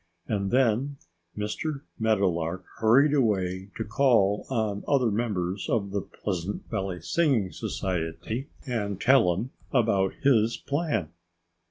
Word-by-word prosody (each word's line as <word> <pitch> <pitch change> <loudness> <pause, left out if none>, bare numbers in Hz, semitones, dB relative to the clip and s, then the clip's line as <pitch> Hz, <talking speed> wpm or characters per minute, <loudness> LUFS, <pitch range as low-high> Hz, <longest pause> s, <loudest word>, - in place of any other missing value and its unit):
And 100 -3 -1
then 130 +3 +2 0.4
Mr. 135 +8 -3 0.2
Meadowlark 95 -5 +1
hurried 130 +7 +5
away 95 -7 +1
to 110 - -1
call 110 -3 +2
on 110 -5 -1
other 130 -6 +3
members 100 -4 -2
of 100 -4 0
the 100 0 -1
Pleasant 95 0 -4
Valley 95 -2 -3
Singing 115 - +1
Society 95 - -3 0.2
and 105 -7 -2
tell 125 -7 +5
them 115 +8 -4 0.2
about 100 -7 +2
his 115 -4 +4
plan. 145 - -1
105 Hz, 120 wpm, -27 LUFS, 95-130 Hz, 0.4 s, hurried